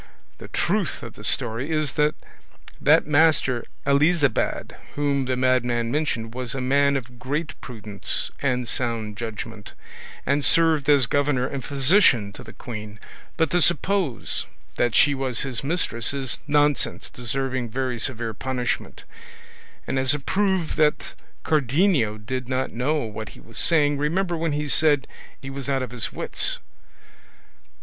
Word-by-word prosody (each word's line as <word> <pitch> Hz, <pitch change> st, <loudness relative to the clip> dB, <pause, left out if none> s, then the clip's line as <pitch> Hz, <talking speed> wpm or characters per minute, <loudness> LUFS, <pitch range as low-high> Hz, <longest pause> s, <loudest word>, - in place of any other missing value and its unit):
The -, -, -9 dB
truth -, -, -1 dB
of -, -, -8 dB
the -, -, -12 dB
story 115 Hz, +6 st, -1 dB
is 155 Hz, -3 st, 0 dB
that 150 Hz, 0 st, +2 dB, 0.7 s
that -, -, +5 dB
Master 145 Hz, -5 st, +3 dB, 0.2 s
Elisabad 145 Hz, -1 st, +2 dB, 0.2 s
whom 140 Hz, -2 st, 0 dB
the 130 Hz, 0 st, 0 dB
madman 125 Hz, -2 st, +1 dB
mentioned 120 Hz, -6 st, -1 dB
was 125 Hz, 0 st, -4 dB
a -, -, -2 dB
man 140 Hz, +2 st, +3 dB
of 125 Hz, -2 st, -9 dB
great 150 Hz, +5 st, -3 dB
prudence 105 Hz, -5 st, -4 dB
and 125 Hz, -3 st, 0 dB
sound 115 Hz, -4 st, -2 dB
judgment, 110 Hz, -1 st, -7 dB, 0.5 s
and 140 Hz, +1 st, +1 dB
served 160 Hz, -3 st, +4 dB
as 140 Hz, -4 st, +6 dB
governor 145 Hz, -1 st, +1 dB
and 135 Hz, 0 st, -4 dB
physician 135 Hz, -, +4 dB
to -, -, -10 dB
the -, -, -11 dB
queen, 105 Hz, -3 st, -8 dB, 0.4 s
but 160 Hz, -, +1 dB
to 175 Hz, -, +3 dB
suppose 175 Hz, -3 st, +1 dB, 0.3 s
that 120 Hz, -2 st, +1 dB
she 145 Hz, -, +6 dB
was 130 Hz, -3 st, -1 dB
his 135 Hz, -2 st, -3 dB
mistress 140 Hz, -6 st, 0 dB
is 135 Hz, -2 st, 0 dB
nonsense 145 Hz, -1 st, +1 dB
deserving 130 Hz, 0 st, -2 dB
very 125 Hz, 0 st, -2 dB
severe 115 Hz, -3 st, -2 dB
punishment; 125 Hz, +2 st, -3 dB, 0.8 s
and 135 Hz, -, -1 dB
as 130 Hz, +2 st, +3 dB
a -, -, -3 dB
proof 190 Hz, +2 st, 0 dB
that 150 Hz, -1 st, +1 dB, 0.3 s
Cardenio 145 Hz, -, +2 dB
did 125 Hz, +3 st, -5 dB
not 130 Hz, 0 st, -1 dB
know 145 Hz, +6 st, 0 dB
what 110 Hz, 0 st, -6 dB
he -, -, -13 dB
was 115 Hz, -, -6 dB
saying, 145 Hz, -4 st, +3 dB
remember 175 Hz, +4 st, 0 dB
when 165 Hz, -2 st, -1 dB
he 150 Hz, 0 st, -2 dB
said 145 Hz, 0 st, +3 dB
it -, -, -20 dB, 0.3 s
he 135 Hz, 0 st, -8 dB
was 140 Hz, 0 st, -5 dB
out 135 Hz, -1 st, +1 dB
of 125 Hz, -, -6 dB
his 125 Hz, -2 st, 0 dB
wits." -, -, 0 dB
135 Hz, 150 wpm, -24 LUFS, 120-150 Hz, 0.8 s, as